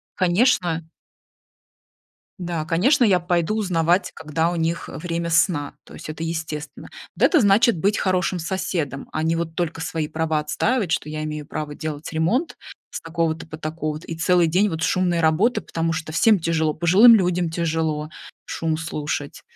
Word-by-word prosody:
конечно. 175 -4 +2 1.5
Да, 170 -3 -3
конечно, 180 - +2
я 195 -6 +5
пойду 175 +3 0
узнавать, 180 -3 +1
когда 160 +2 -1
у 175 - -3
них, 165 +1 -2
э, - - -8
время 170 0 -3
сна, 165 -3 +1
то - - -15
есть - - -9
это 155 +1 -6
естественно. 160 -2 -5 0.3
Вот - - +2
это 330 - +5
значит 210 +1 +4
быть 200 +4 +1
хорошим 185 -1 0
соседом, 170 -5 -3
а 155 - -1
не 165 +1 +1
вот 165 -1 -3
только 165 -2 -2
свои 160 -1 -2
права 160 0 -1
отстаивать, 185 +5 0
что - - -1
я 155 0 -4
имею 150 -1 -5
право 150 -1 -5
делать 155 0 -6
ремонт 195 - 0 0.4
с - - -5
такого-то 165 -1 -2
по 155 -1 -8
такого-то 155 0 -4
и 165 - -5
целый 175 +1 +3
день 185 +6 +2
вот 160 -2 -4
шумные 175 0 +1
работы. 165 +10 +2
Потому 165 0 -2
что 160 0 -4
всем 210 +5 +4
тяжело: 160 -2 0
пожилым 200 +8 +7
людям 180 -3 0
тяжело 160 -2 -1 0.4
шум 160 -1 -2
слушать. 150 -3 -4
165 Hz, 165 wpm, -22 LUFS, 160-180 Hz, 1.5 s, пожилым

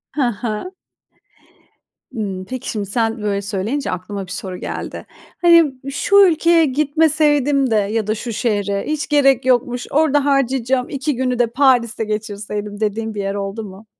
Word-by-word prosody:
Hı 295 - 0
hı. 230 - -4 1.4
Imm, 200 -6 -4
peki 255 +5 -6
şimdi 210 -2 -3
sen 225 +2 -1
böyle 200 -1 -1
söyleyince 210 +8 -2
aklıma 190 +2 -5
bir 180 - -11
soru 185 -1 -5
geldi. - - -6 0.4
Hani, 335 -5 +6 0.2
şu 280 +8 0
ülkeye 335 0 +3
gitmeseydim 290 -1 +2
de - - +3
ya 210 +1 0
da 215 - 0
şu 235 +1 -5
şehre. 205 -3 -1
Hiç 310 0 -2
gerek 275 -4 +3
yokmuş. 245 -1 +1
Orada 290 -1 +2
harcayacağım 265 -2 +1
2 275 +1 -2
günü 250 0 -1
de 240 - +3
Paris'te 240 -3 +2
geçirseydim, 210 -1 -5
dediğin 220 +1 -2
bir 205 - -2
yer 195 0 -3
oldu 200 +2 -4
mu? 200 +1 -11
235 Hz, 155 wpm, -19 LUFS, 205-275 Hz, 1.4 s, Hani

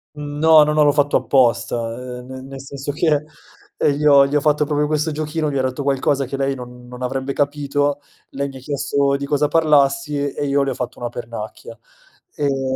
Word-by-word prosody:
Mhmm, 145 0 -6
no, 160 0 +7
no, 150 - 0
no, 150 0 +3
l'ho 145 - +4
fatto 145 0 +2
apposta, 125 -3 +2 0.4
ehm, 125 - -11
ne 130 0 -8
nel 135 0 -9
senso 140 +1 -6
che, 150 -1 +1 0.5
ehm, 145 - +2
gli 150 +2 -3
ho 140 -1 +7
gli 140 - -4
ho 150 - +3
fatto 150 0 +2
proprio 150 0 0
questo 155 +1 0
giochino, 155 0 -2
gli 140 - -1
ho - - +1
detto 130 +2 -2
qualcosa 135 0 +1
che 135 +2 -5
lei 135 0 0
non 125 -1 -10
non 125 +1 -10
avrebbe 135 +2 -2
capito, 145 0 0 0.3
lei 140 +1 -3
mi 135 - -10
ha - - -9
chiesto 140 0 0
di 140 0 -5
cosa 145 +1 +1
parlassi 145 -2 +2
e 145 - -3
io 140 0 +2
le 135 - 0
ho 130 - -3
fatto 125 0 -5
una 120 - -3
pernacchia, 115 -1 -8 0.6
ehm, 135 -2 -1
140 Hz, 215 wpm, -20 LUFS, 135-150 Hz, 0.6 s, no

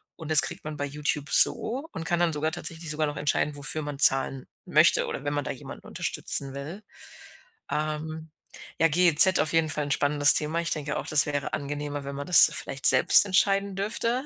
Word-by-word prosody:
Und 160 -2 -10
das 155 -2 +8
kriegt 175 +2 -7
man 155 0 -8
bei 145 - -4
YouTube 145 0 -4
so 270 +8 +3
und 165 - -8
kann 175 +1 -2
dann 175 -1 0
sogar 155 +1 -4
tatsächlich 165 0 -5
sogar 155 0 -3
noch 145 +1 -7
entscheiden, 145 0 -2
wofür 150 +2 -1
man 145 -2 -8
zahlen 135 -1 +1 0.2
möchte - - +2
oder 135 - -8
wenn 145 - -3
man 145 0 -3
da - - -6
jemanden 135 - -12
unterstützen 135 -1 0
will. 155 +10 -10 0.9
Ähm, 155 +1 -6 0.5
ja, 165 - +3
GEZ 175 +2 +5
auf 155 - -1
jeden 165 -1 0
Fall 150 0 -2
'n 145 - -7
spannendes 145 0 +2
Thema. 155 +2 -1
Ich 170 - -3
denke 150 -1 -4
auch, - - -7
das 145 -1 +4
wäre 145 -2 -5
angenehmer, 145 0 -6
wenn 140 0 -8
man 140 +1 -7
das 180 -4 +6
vielleicht 135 0 -4
selbst 130 +9 +5
entscheiden 195 0 0
dürfte. 230 +5 -3
150 Hz, 200 wpm, -24 LUFS, 145-165 Hz, 0.9 s, das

